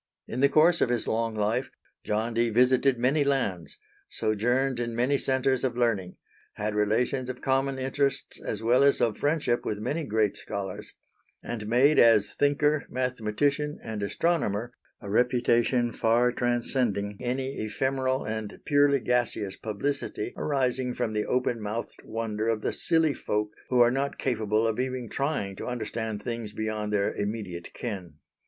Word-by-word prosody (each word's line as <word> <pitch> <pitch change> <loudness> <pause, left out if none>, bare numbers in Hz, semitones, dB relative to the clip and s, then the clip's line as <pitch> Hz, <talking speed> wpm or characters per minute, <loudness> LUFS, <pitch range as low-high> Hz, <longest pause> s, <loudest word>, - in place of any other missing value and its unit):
In 120 - -4
the 140 +1 +5
course 160 +4 +4
of - - +3
his 120 -3 -1
long 115 0 0
life 110 +5 0 0.3
John 110 +2 -1
Dee 115 +1 +2
visited 125 +3 +3
many 135 +5 +2
lands, 125 - -1 0.3
sojourned 120 +4 0
in 120 -1 -3
many 125 +4 +2
centres 130 -1 +1
of 125 -2 -1
learning, 105 -7 0 0.4
had 105 +1 -3
relations 115 +5 0
of 130 0 -5
common 135 0 +1
interests 135 +1 -1
as 110 0 -4
well 125 +4 +4
as 140 0 +4
of 115 -3 +1
friendship 145 -5 +1
with 105 - -2
many 150 +10 -2
great 110 -5 +1
scholars, 95 -2 -5 0.5
and 110 -3 -5
made 130 +7 +4
as 110 -3 +5
thinker, 145 0 +2
mathematician, 130 +4 -1
and 110 -2 -5
astronomer, 120 - 0 0.3
a - - -8
reputation 120 +2 +2
far 120 +2 +2
transcending 120 -4 0
any 130 +2 -2
ephemeral 130 +4 -1
and 110 -1 -5
purely 145 -2 +4
gaseous 120 -6 0
publicity 115 +1 -3
arising 130 -3 0
from 120 -3 -2
the 105 0 -1
open 125 -2 0
mouthed 105 +3 -5
wonder 110 -1 -3
of 110 -2 0
the - - 0
silly 160 -3 +2
folk 105 -4 -2 0.2
who 125 - +2
are 120 0 +6
not 140 +2 -1
capable 110 -3 0
of 115 +1 0
even 130 -1 -2
trying 135 -9 -1
to - - -6
understand 110 -3 -3
things 115 -3 -4
beyond 110 -1 -3
their 100 -1 +1
immediate 100 -5 -4
ken. 100 -8 -5
120 Hz, 155 wpm, -27 LUFS, 110-130 Hz, 0.5 s, are